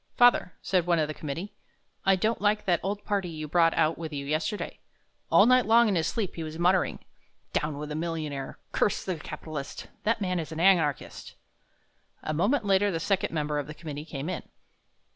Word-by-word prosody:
"Father," 245 -6 +5
said 180 -3 +1
one 175 -1 +3
of 155 -2 +1
the 155 - -4
committee, 160 +7 -5 0.5
"I 195 - +6
don't 215 +4 0
like 210 0 +2
that 175 -3 +3
old 205 +2 -3
party 200 -3 -1
you 155 -2 -6
brought 165 +1 +3
out 160 0 +2
with 160 -1 -5
you 140 -1 -4
yesterday. 155 +8 -2 0.5
All 200 - +7
night 255 -1 +5
long 230 +1 +6
in 205 - +2
his 165 -3 +1
sleep 195 +2 -2
he 165 - -6
was 155 0 -6
muttering: 180 +2 +1 0.5
'Down 150 -1 -1
with 150 0 -5
the 150 - -4
millionaire; 155 -4 -4
curse 205 - +1
the 185 -3 -2
capitalist' 150 -1 -7
that 225 +1 +1
man 180 -3 -1
is 160 -1 -5
an 160 - -5
anarchist." 170 -6 +1 0.9
A 155 - -2
moment 205 - +1
later 200 +1 +3
the 165 -4 -1
second 195 +3 0
member 150 -2 -1
of 145 - -4
the 155 - -8
committee 150 -2 -6
came 145 -2 -5
in. 185 -2 -3
170 Hz, 200 wpm, -28 LUFS, 155-195 Hz, 0.9 s, All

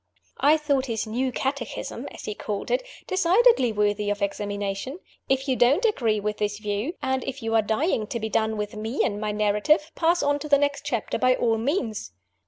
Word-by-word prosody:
I 300 +3 +5
thought 280 -3 0
his 230 -2 -2
"new 250 +4 -1
Catechism" 270 +3 -4
(as - - -10
he 210 - -3
called 205 -1 -4
it) - - +2 0.2
decidedly 375 - +4
worthy 205 -1 0
of 205 0 -1
examination. 205 - -3 0.3
If 270 +1 +1
you 260 - +2
don't 270 - +4
ag 430 - +1
ree 215 -2 +2
with 210 0 -2
this 205 -1 -1
view, 210 - -3
and 265 0 0
if 270 -2 -5
you 225 0 -1
are 225 - +5
dying 220 - 0
to 235 - -3
be 220 - -2
done 220 0 0
with 210 0 -4
me 220 +4 -1
and 205 0 -1
my 210 -1 -1
narrative, 215 +10 +2
pass 340 0 +2
on 285 0 +2
to 300 +1 -7
the 285 - +6
next 285 0 -1
chapter 235 -4 -2
by 255 0 +4
all 225 -3 +1
means! 225 - -2
235 Hz, 205 wpm, -25 LUFS, 210-285 Hz, 0.3 s, the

